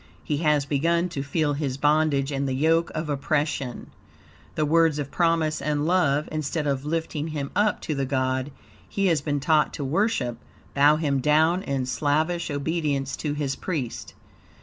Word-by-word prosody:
He 150 - -1
has 150 -2 +2
begun 170 +5 +1
to 140 - -4
feel 145 +1 0
his 140 -3 -2
bondage 150 -1 +2
and 140 0 -1
the 130 - -1
yoke 165 +4 +2
of 155 0 -2
oppression. 145 -2 -2 0.6
The 155 - +1
words 165 0 +3
of 140 -2 -4
promise 165 -3 +1
and 150 0 0
love, 155 -4 +2
instead 155 0 -2
of 140 -1 -1
lifting 160 -1 -2
him 145 -3 -4
up 210 +1 +2
to 155 - -3
the 135 -2 -2
God 130 0 0 0.4
he 195 - -1
has 165 -6 +2
been 145 0 -1
taught 150 +2 +2
to 145 - -4
worship, 135 - 0 0.3
bow 145 +2 +5
him 145 -3 0
down 155 +6 +3
in 135 -6 -2
slavish 155 +6 0
obedience 145 -2 -1
to 150 -2 -2
his 145 -2 -2
priest. 145 -10 -4
150 Hz, 170 wpm, -25 LUFS, 140-160 Hz, 0.6 s, bow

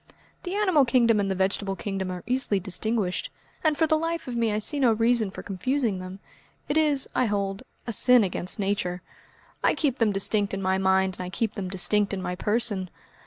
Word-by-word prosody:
"The 360 +1 -5
animal 375 -9 +3
kingdom 235 -3 +3
and 200 -1 0
the 190 - -1
vegetable 195 +1 -1
kingdom 195 -2 -4
are 180 -1 -6
easily 245 -5 0
distinguished, 190 +1 -1 0.3
and 310 -2 +2
for 325 - +3
the 315 0 +2
life 330 -1 -3
of 250 - -4
me 230 -2 +1
I 210 - 0
see 285 +7 -1
no 245 -4 +4
reason 230 -1 +2
for 190 - -9
confusing 225 +1 -1
them. 185 +1 -8 0.5
It 290 - -1
is, 300 -3 +2
I 255 - +2
hold, 200 -1 -2 0.2
a 235 - -3
sin 250 +2 +6
against 185 -1 -2
Nature. 195 -3 -2 0.6
I - - +3
keep 280 -5 -1
them 225 -3 +3
distinct 200 0 +1
in 195 - -5
my 190 0 +1
mind 190 0 +2
and - - -3
I 180 - -5
keep 220 +3 -2
them 190 -2 -5
distinct 200 +2 +2
in - - -5
my 180 - -3
person. 205 -1 0
210 Hz, 210 wpm, -26 LUFS, 190-250 Hz, 0.6 s, sin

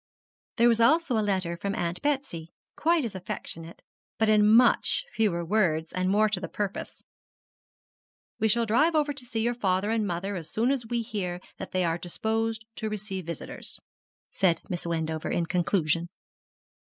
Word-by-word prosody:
There 235 0 +5
was 230 -1 +4
also 285 +2 +4
a 220 - +2
letter 190 -4 0
from 200 +4 -3
Aunt 175 -3 -2
Betsy, 270 - -2 0.2
quite 330 -3 +2
as 220 - -4
affectionate, 170 -2 -6 0.3
but 220 -1 +2
in 210 0 +5
much 250 - +4
fewer 175 -6 +1
words, 165 -5 +1
and 185 0 0
more 210 +2 +4
to 205 -3 -1
the 175 - -4
purpose. 205 -1 -4 1.4
'We 220 - +3
shall 230 +2 +2
drive 300 +10 +3
over 295 -1 +2
to 265 -3 -6
see 225 -2 -2
your 240 +2 +1
father 200 -2 0
and 220 -2 +1
mother 190 +3 -2
as 165 -3 -5
soon 235 +4 +2
as 255 -5 -2
we 235 0 -1
hear 195 -6 -3 0.2
that - - -5
they 185 -1 +1
are 165 0 0
disposed 220 +5 -2
to 220 - -2
receive 195 -4 -5
visitors,' 170 -3 -7 0.5
said 175 -4 +2
Miss 175 -1 -3
Wendover 160 -1 -2
in 170 - 0
conclusion. 170 -1 +1
205 Hz, 170 wpm, -27 LUFS, 175-230 Hz, 1.4 s, There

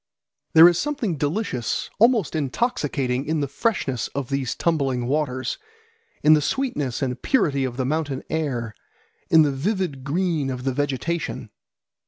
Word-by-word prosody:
There 160 +1 +10
is 175 -1 +3
something 275 - -1
delicious, 145 - -2
almost 225 - +3
intoxicating, 140 - -1
in 160 0 0
the 140 - 0
freshness 140 - -1
of 140 -3 -3
these 135 -2 -1
tumbling 135 -7 0
waters, 130 -1 -1 0.6
in 155 - +7
the 155 - +4
sweetness 145 - -1
and 125 -1 -3
purity 140 - +1
of 125 -1 -5
the 130 - -1
mountain 145 -1 -2
air, 130 -8 -2 0.6
in 160 -1 +7
the 145 - +1
vivid 155 -1 -2
green 160 -1 0
of 125 -1 -4
the 135 -1 0
vegetation. 145 +5 -2
145 Hz, 145 wpm, -23 LUFS, 130-170 Hz, 0.6 s, There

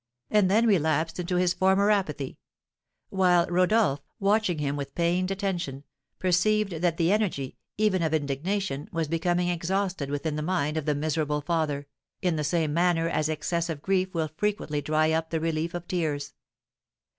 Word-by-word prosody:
and 210 -3 +4
then 220 +4 +4
relapsed 165 -4 +1
into 180 +1 -2
his 180 0 +2
former 190 +3 +3
apathy; 150 -10 -1 0.7
while 180 -2 +4
Rodolph, 180 -4 +2 0.2
watching 200 -3 +2
him 145 -1 -1
with 140 -1 -6
pained 175 +2 +1
attention, 180 -8 -3 0.3
perceived 195 +3 +2
that 170 -2 +1
the 170 +1 +2
energy, 195 -11 -1 0.2
even 210 -4 +2
of 160 -2 +1
indignation, 155 +2 -2
was 165 -2 -1
becoming 175 +2 0
exhausted 175 -3 -1
within 145 +2 -2
the - - -2
mind 150 -3 0
of 155 -2 -2
the 150 -2 +1
miserable 150 0 -1
father, 150 -3 -1 0.3
in 180 -3 0
the 150 - -1
same 155 0 0
manner 170 0 +2
as 155 -2 0
excess 170 +2 -1
of 150 -3 -5
grief 190 -1 +1
will 160 -2 -1
frequently 200 -8 -1
dry 155 +1 +2
up 160 0 0
the 165 - -1
relief 165 +1 -2
of 175 0 -6
tears. 150 -5 -2
170 Hz, 165 wpm, -27 LUFS, 150-185 Hz, 0.7 s, and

